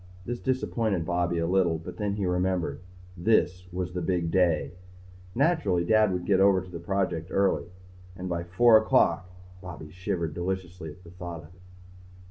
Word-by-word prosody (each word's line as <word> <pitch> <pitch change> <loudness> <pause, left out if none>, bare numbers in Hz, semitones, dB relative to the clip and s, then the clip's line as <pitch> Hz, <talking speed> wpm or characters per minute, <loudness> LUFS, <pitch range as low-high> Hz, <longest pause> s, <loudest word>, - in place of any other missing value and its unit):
This 120 0 -4
disappointed 115 -8 -1
Bobby 85 0 0
a 85 - 0
little 90 -2 +2
but 80 - -9
then 105 -2 -1
he 100 -2 -2
remembered 90 -1 -1 0.3
this 90 -1 +1
was 90 0 -4
the 90 - -3
big 85 -1 -1
day. 85 -4 +2 0.6
Naturally 115 - +2
Dad 110 0 +4
would 90 -1 -3
get 95 -2 +3
over 100 -1 +5
to 95 0 -10
the 85 - -6
project 85 -2 -1
early. 95 -3 +1 0.5
And 90 0 -5
at 85 0 -3
four 115 +4 +6
o'clock 90 -5 +2 0.3
Bobby 85 -4 -9
shivered 85 -2 -3
deliciously 90 -1 -4
at 85 +5 -13
the 85 - -13
thought 90 -3 -7
of 80 +4 -16
it. 90 - -22
90 Hz, 170 wpm, -27 LUFS, 85-95 Hz, 0.6 s, four